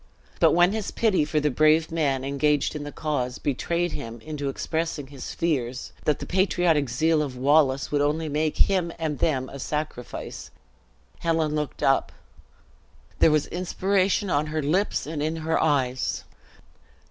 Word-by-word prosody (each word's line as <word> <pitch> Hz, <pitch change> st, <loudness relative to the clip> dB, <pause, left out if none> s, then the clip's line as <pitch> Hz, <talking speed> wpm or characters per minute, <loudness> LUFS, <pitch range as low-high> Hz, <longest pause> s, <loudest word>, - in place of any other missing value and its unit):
But -, -, +5 dB
when 175 Hz, +2 st, +5 dB
his 215 Hz, -1 st, -3 dB
pity 210 Hz, -8 st, +2 dB
for 150 Hz, +1 st, 0 dB
the 150 Hz, 0 st, +1 dB
brave 155 Hz, +4 st, +3 dB
man 140 Hz, -5 st, 0 dB
engaged 145 Hz, +1 st, +1 dB
in 150 Hz, -, -4 dB
the 145 Hz, -, -6 dB
cause, 130 Hz, -6 st, -2 dB
betrayed 170 Hz, +5 st, -1 dB
him 115 Hz, 0 st, -6 dB
into 145 Hz, -1 st, -4 dB
expressing 160 Hz, +1 st, -2 dB
his 135 Hz, -1 st, -8 dB
fears 130 Hz, -7 st, -2 dB
that 150 Hz, -, +2 dB
the -, -, -6 dB
patriotic 175 Hz, -6 st, +2 dB
zeal 155 Hz, +6 st, +2 dB
of 135 Hz, -4 st, -4 dB
Wallace 140 Hz, 0 st, +3 dB
would 145 Hz, -1 st, +2 dB
only 155 Hz, +2 st, 0 dB
make 150 Hz, +1 st, -1 dB
him 180 Hz, -3 st, +2 dB
and 155 Hz, -4 st, -3 dB
them 130 Hz, -4 st, +1 dB
a 140 Hz, -, -9 dB
sacrifice, 150 Hz, -3 st, -5 dB, 0.7 s
Helen 160 Hz, -2 st, 0 dB
looked 150 Hz, -1 st, -3 dB
up; 135 Hz, -, +2 dB, 1.1 s
there -, -, +6 dB
was 155 Hz, -1 st, +2 dB
inspiration 190 Hz, +2 st, 0 dB
on 145 Hz, +1 st, +1 dB
her 155 Hz, 0 st, -2 dB
lips 180 Hz, +8 st, 0 dB
and 150 Hz, 0 st, -4 dB
in 155 Hz, +2 st, -1 dB
her 160 Hz, 0 st, 0 dB
eyes. 130 Hz, -5 st, 0 dB
150 Hz, 160 wpm, -25 LUFS, 140-165 Hz, 1.1 s, there